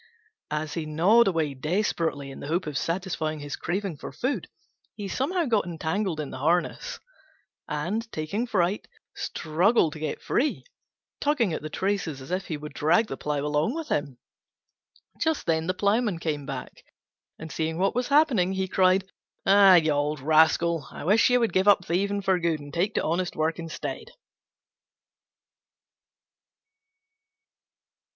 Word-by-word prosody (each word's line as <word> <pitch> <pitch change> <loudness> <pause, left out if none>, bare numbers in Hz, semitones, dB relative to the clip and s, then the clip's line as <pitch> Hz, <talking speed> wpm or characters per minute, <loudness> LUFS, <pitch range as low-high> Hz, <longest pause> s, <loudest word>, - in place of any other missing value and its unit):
As 150 0 -3
he 160 -3 -3
gnawed 190 +10 +4
away 160 -6 0
desperately 155 -2 -1
in - - -10
the - - -7
hope 170 +4 0
of 150 -2 -5
satisfying 165 -2 -2
his 145 -1 -5
craving 185 -1 -3
for - - -8
food, 265 +3 -2 0.5
he 205 -2 -5
somehow 330 - 0
got 225 -6 +2
entangled 170 +1 -2
in 150 -3 -4
the 130 - -7
harness, 175 - 0 0.7
and, 210 +10 -3
taking 195 +10 -2
fright, 190 -1 0 0.3
struggled 165 +2 +1
to 155 - -9
get 155 -1 -3
free, 290 +4 0 0.6
tugging 250 - +1
at - - -3
the 155 - -6
traces 185 -5 -2
as 130 +5 -10
if 185 +1 -2
he 155 - -3
would 150 0 -9
drag 175 +11 +2
the - - -3
plough 145 -1 -2
along 150 - 0
with 325 -2 -5
him. 145 -4 -1 1.0
Just 320 -2 0
then 160 -1 +1
the 185 - +1
Ploughman 205 0 +1
came 150 -4 -3
back, 135 -3 -7 0.5
and 160 -1 -8
seeing 160 0 -2
what 195 +2 +1
was 250 +1 -1
happening, 275 - +3
he 190 0 -1
cried, 185 0 +3 0.4
"Ah, 195 -1 +7
you 160 -3 +4
old 145 +1 0
rascal, 160 +1 +3
I - - -9
wish 210 +10 +4
you 250 0 +4
would 230 -2 0
give 190 +2 +2
up 195 -4 +5
thieving 200 +3 0
for 190 -1 +2
good 165 -2 0
and 145 0 -11
take 185 +6 0
to - - +1
honest 175 +2 -1
work 160 +2 0
instead." 165 -1 -5
170 Hz, 160 wpm, -26 LUFS, 155-200 Hz, 1.0 s, Ah